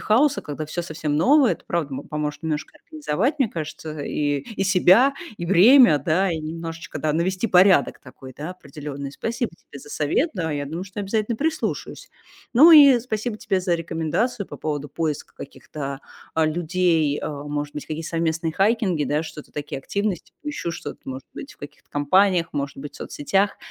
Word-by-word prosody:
хаоса, 260 +7 +3
когда 150 +1 -5
всё 155 +3 -4
совсем 155 -3 -3
новое, 270 - +5
это, - - -8
правда, 160 -5 -2
мо 135 +1 -4
поможет 150 +1 -4
немножко 160 - -4
организовать, 295 - -2
мне 265 -6 +2
кажется, 155 -1 -6
и, 145 0 -1 0.2
и 195 - 0
себя, 190 +8 +5 0.2
и 175 - -5
время, 195 - +7
да, 175 +7 +1
и 160 - -2
немножечко, 165 0 -6
да, 150 +1 0
навести 185 +6 0
порядок 185 - +4
такой, 130 0 -13
да, 150 +6 -6
определённый. 140 -4 -8
Спасибо 235 - -3
тебе 140 - -14
за 145 - -13
совет. 155 - 0
Да, 165 -6 -2
я 145 -1 -2
думаю, 165 +6 -5
что 195 +1 -11
я - - -2
обязательно 215 +3 -1
прислушаюсь. 315 +3 -3 0.5
Ну 300 +8 +9
и 280 -6 +9
спасибо 220 -1 -3
тебе 190 -3 -1
за 180 -2 +1
рекомендацию 165 +7 -2
по - - -9
поводу 145 -2 -3
поиска 155 -1 -3
каких-то, 140 0 -7 0.3
э, 160 -1 +3
людей. 160 -2 +1
Э, - - -3
может 145 0 -5
быть, 150 - -5
какие-то 160 +1 -5
совместные 165 -1 -1
хайкинги, 195 -4 +1
да, 150 +2 0
что-то 155 -2 -10
такие 145 -1 -5
активности. 200 +5 -3
Поищу 295 -12 -4
что-то, 165 - -7
может 130 0 -7
быть, 280 - -8
в - - -31
каких-то 145 +1 -12
компаниях, 175 +4 +3
может 140 -1 -3
быть, 145 +1 -8
в - - -10
соцсетях. 195 +7 -1
165 Hz, 180 wpm, -23 LUFS, 150-200 Hz, 0.5 s, Ну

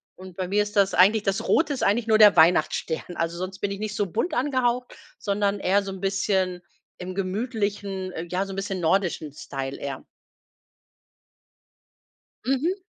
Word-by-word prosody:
Und 185 -1 -12
bei 185 -1 -2
mir 205 +2 +2
ist 210 0 -8
das 200 -1 +3
eigentlich 200 +4 +5
das 195 -1 -1
Rote 310 -2 +3
ist 265 - -3
eigentlich 225 +3 +2
nur 220 -1 +5
der 210 -3 +8
Weihnachtsstern. 165 +1 +2
Also 165 +1 -2
sonst 185 +1 -5
bin 205 - -1
ich 200 - -4
nicht 215 0 -4
so 205 - 0
bunt 350 - -1
angehaucht, 250 -2 0 0.2
sondern 200 0 0
eher 200 +2 +2
so 195 - -5
'n 190 0 -8
bisschen 190 -2 0 0.4
im 185 +1 -6
gemütlichen 200 -2 -2
ähm, 165 +1 -5
ja, 190 +2 0
so 195 - -6
'n - - -6
bisschen 195 -1 -3
nordischen 165 -4 0
Style 135 -2 -6
eher. 135 -2 -5 2.4
Mhm. 320 +9 0
195 Hz, 170 wpm, -25 LUFS, 180-210 Hz, 2.4 s, der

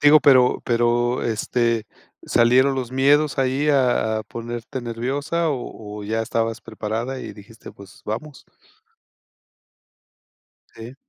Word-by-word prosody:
Digo, 150 +1 +7
pero 130 -2 +5
pero, 120 +1 +1
este, 115 0 0 0.4
¿salieron 130 +4 +4
los 130 -2 -4
miedos 140 +3 +2
ahí 135 +3 +1
a 125 -6 +2
a - - -5
ponerte 120 +2 -6
nerviosa? 135 +8 -2
o 110 -6 -6
o - - -7
ya 110 +2 -1
estabas 115 0 -2
preparada 115 +4 -4
y - - -7
dijiste: 110 +2 -13
"Pues, 100 -1 -15
vamos". 135 +7 -6 2.3
Sí. 115 +3 -10
120 Hz, 120 wpm, -22 LUFS, 115-135 Hz, 2.3 s, Digo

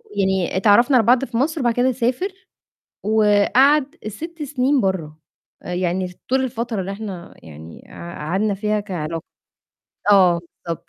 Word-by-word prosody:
يعني 190 -2 0
اتعرّفنا 235 +7 +5
على 225 - +3
بعض 250 +2 +4
في 235 - -5
مصر 300 +4 0
وبعد 240 -2 +2
كده 245 +2 +2
سافر 255 - -1 0.7
وقعد 240 +8 +3
6 325 - -8
سنين 275 -1 +1
برّه، 175 -7 -2 0.4
يعني 180 +1 -2 0.2
طول 265 +1 +2
الفترة 230 -3 -3
اللي 190 +1 -4
إحنا 195 -4 -8
يعني 80 +1 -12
قع 170 0 -9
قعدنا 200 +4 0
فيها 210 +1 -1
كعلاق 165 -5 -5 0.9
آه 180 -4 +5 0.3
بالضبط. 170 -1 -2
210 Hz, 140 wpm, -21 LUFS, 185-255 Hz, 0.9 s, اتعرّفنا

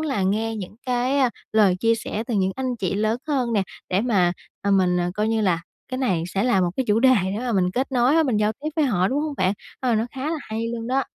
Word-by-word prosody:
là 275 -10 -1
nghe 220 +4 0
những 200 0 -7
cái, 250 +3 +1
a, 255 -3 +3 0.2
lời 205 -4 +4
chia 230 +4 +2
sẻ 220 0 -4
từ 240 - -2
những 190 -1 +1
anh 255 -2 -2
chị 195 -4 -2
lớn 215 +3 0
hơn 255 -5 0
nè, 205 -3 +2 0.3
để 185 +1 +1
mà, 195 -7 +2 0.3
à, 200 - 0
mình, 180 -2 +3
à, 175 0 -1
coi 210 +2 0
như 225 0 +1
là 180 -5 +1 0.3
cái 255 0 -4
này 185 -11 0
sẽ 195 +5 -1
là 200 -7 +3
một 175 -1 +1
cái 265 - 0
chủ 210 +2 +3
đề 260 +1 +6
để 195 +2 -2
mà 245 0 -2
mình 180 -3 +2
kết 260 +6 -2
nối 250 +2 +3
á, 325 - +5
mình 255 -8 +1
giao 210 0 +2
tiếp 285 +7 -5
với 310 - +3
họ, 190 -7 +2
đúng 280 +4 0
hông 305 -2 -3
bạn? 185 0 +2 0.3
Ờ, 250 -3 +1
nó 220 +2 +1
khá 270 +2 -4
là 325 - -2
hay 225 -2 -4
luôn 230 -1 -4
đó. 265 +1 +1
225 Hz, 280 wpm, -23 LUFS, 195-255 Hz, 0.3 s, đề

